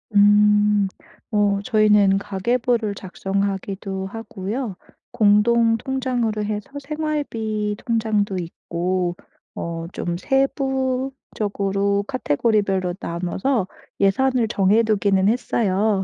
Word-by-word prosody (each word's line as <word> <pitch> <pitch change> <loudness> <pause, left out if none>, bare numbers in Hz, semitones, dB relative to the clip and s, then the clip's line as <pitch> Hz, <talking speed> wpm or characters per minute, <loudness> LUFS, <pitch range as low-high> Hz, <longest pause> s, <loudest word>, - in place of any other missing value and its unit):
음. 205 0 +5 0.4
어 205 -1 +2
저희는 210 -3 +4
가계부를 225 +2 0
작성하기도 195 0 -3
하고요 220 +1 -5 0.4
공동 225 +2 +4
통장으로 245 -4 -1
해서 210 -1 -4
생활비 275 -9 -2
통장도 215 -4 0
있고 175 +1 -2 0.4
어 165 0 -4
좀 170 0 -3
세부적으로 260 -7 -1
카테고리별로 195 - 0
나눠서 185 +6 -1 0.3
예산을 240 +5 +2
정해 205 +2 +3
두기는 200 -3 +2
했어요. 210 -4 +1
210 Hz, 225 characters per minute, -22 LUFS, 195-235 Hz, 0.4 s, 음